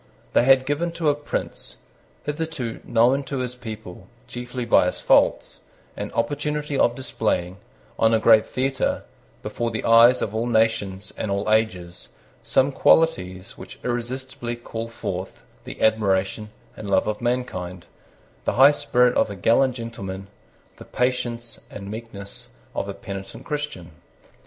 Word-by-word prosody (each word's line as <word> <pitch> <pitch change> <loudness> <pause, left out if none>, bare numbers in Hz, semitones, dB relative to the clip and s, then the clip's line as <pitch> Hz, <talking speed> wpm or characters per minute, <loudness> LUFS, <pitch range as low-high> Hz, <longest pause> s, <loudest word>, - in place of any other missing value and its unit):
They - - +4
had 130 0 +5
given 150 +5 -1
to 165 -3 +1
a - - 0
prince, 145 0 -5 0.5
hitherto 150 -6 -3
known 120 +4 +3
to 135 +1 -4
his 125 -1 -2
people 110 -7 -9 0.2
chiefly 125 0 -5
by 115 - +5
his - - -3
faults, - - +3 0.4
an - - -5
opportunity 145 +5 -1
of 120 -3 +3
displaying, 95 -8 -1 0.4
on 110 - +4
a 115 - +5
great 110 -1 +5
theatre, 135 +1 -1 0.4
before 120 0 -2
the 110 -1 -4
eyes 115 +2 +6
of 105 - -3
all 115 +2 -1
nations 110 -4 0
and 110 - -2
all 100 +2 -1
ages, 90 -5 -1 0.3
some 135 +2 +2
qualities 115 - +2
which - - -10
irresistibly 120 0 -3
call 115 -1 -6
forth 95 -5 -6 0.2
the - - -8
admiration 105 -1 +1 0.3
and 105 - -7
love 100 - +3
of 105 +1 -3
mankind, 95 -8 -3 0.6
the - - +1
high 135 +3 +8
spirit 125 -4 +3
of - - +2
a 100 - -6
gallant 120 +7 +3
gentleman, 100 -5 -6 0.5
the - - -11
patience 120 -2 -2
and 100 0 -8
meekness 110 -3 -9 0.2
of - - -3
a - - -5
penitent 95 0 -8
Christian. 145 - -4
115 Hz, 145 wpm, -23 LUFS, 100-130 Hz, 0.6 s, high